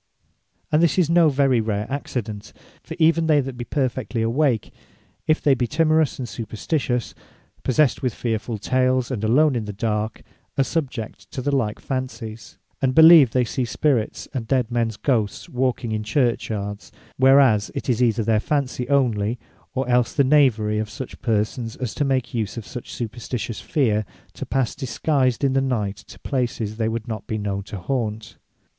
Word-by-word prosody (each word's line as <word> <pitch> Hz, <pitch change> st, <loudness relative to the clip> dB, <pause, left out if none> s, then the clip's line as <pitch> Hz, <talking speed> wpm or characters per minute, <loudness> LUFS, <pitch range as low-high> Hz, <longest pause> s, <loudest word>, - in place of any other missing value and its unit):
And 150 Hz, +1 st, +4 dB
this 170 Hz, -2 st, +3 dB
is 170 Hz, -3 st, +3 dB
no 170 Hz, -2 st, +5 dB
very 135 Hz, -4 st, +2 dB
rare 105 Hz, -1 st, -2 dB
Accident: 110 Hz, -6 st, -5 dB, 0.3 s
for -, -, -8 dB
even 165 Hz, 0 st, +3 dB
they 150 Hz, -2 st, +5 dB
that 135 Hz, -2 st, -3 dB
be 120 Hz, 0 st, -6 dB
perfectly 130 Hz, -4 st, -1 dB
awake, 120 Hz, -2 st, +1 dB, 0.5 s
if 155 Hz, -, +2 dB
they 145 Hz, -, +5 dB
be 125 Hz, -2 st, 0 dB
timorous, 155 Hz, +1 st, +2 dB
and 125 Hz, -, -4 dB
supperstitious, 120 Hz, -, -2 dB, 0.5 s
possessed 130 Hz, +2 st, +2 dB
with 125 Hz, -, 0 dB
fearfull 110 Hz, 0 st, -3 dB
tales, 130 Hz, +3 st, +1 dB
and 115 Hz, -4 st, -3 dB
alone 135 Hz, +6 st, +4 dB
in 115 Hz, -3 st, -2 dB
the 105 Hz, -, -4 dB
dark, 110 Hz, +1 st, -2 dB, 0.3 s
are 135 Hz, -, +4 dB
subject 130 Hz, -7 st, -4 dB
to -, -, -6 dB
the 140 Hz, +2 st, 0 dB
like 110 Hz, -5 st, -1 dB
fancies, 115 Hz, -4 st, -5 dB, 0.2 s
and 130 Hz, -1 st, +1 dB
believe 160 Hz, -4 st, +9 dB
they 125 Hz, +2 st, +2 dB
see 125 Hz, +2 st, -2 dB
spirits 125 Hz, -2 st, 0 dB
and 120 Hz, -5 st, -4 dB
dead 125 Hz, -2 st, +1 dB
mens 115 Hz, -2 st, 0 dB
Ghosts 115 Hz, -7 st, -1 dB
walking 125 Hz, -2 st, -1 dB
in 110 Hz, 0 st, -1 dB
Churchyards; 110 Hz, -3 st, -1 dB, 0.3 s
whereas 130 Hz, -5 st, +5 dB
it -, -, -4 dB
is 125 Hz, -2 st, +1 dB
either 115 Hz, -2 st, +2 dB
their 110 Hz, 0 st, +2 dB
Fancy 130 Hz, -1 st, -1 dB
onely, 120 Hz, -5 st, +1 dB, 0.4 s
or 130 Hz, -1 st, -1 dB
els 125 Hz, +2 st, +2 dB
the 140 Hz, -, +4 dB
knavery 120 Hz, -7 st, +3 dB
of 110 Hz, -1 st, -3 dB
such 115 Hz, +4 st, -8 dB
persons, 115 Hz, +1 st, -1 dB
as 125 Hz, -4 st, -4 dB
make 135 Hz, -2 st, 0 dB
use 110 Hz, -2 st, -2 dB
of 115 Hz, -, -6 dB
such 125 Hz, -, -8 dB
superstitious 115 Hz, 0 st, -5 dB
feare, 110 Hz, -, 0 dB, 0.3 s
to -, -, -7 dB
pass 130 Hz, -3 st, 0 dB
disguised 135 Hz, -1 st, 0 dB
in 135 Hz, -1 st, +2 dB
the 135 Hz, -, +2 dB
night, 105 Hz, -7 st, -1 dB
to -, -, -14 dB
places 120 Hz, -5 st, -2 dB
they 110 Hz, -1 st, 0 dB
would 115 Hz, -1 st, -4 dB
not 110 Hz, -3 st, -5 dB
be 110 Hz, -, -2 dB
known 100 Hz, -1 st, -2 dB
to 100 Hz, +1 st, -8 dB
haunt. 110 Hz, 0 st, -3 dB
125 Hz, 175 wpm, -22 LUFS, 110-135 Hz, 0.5 s, believe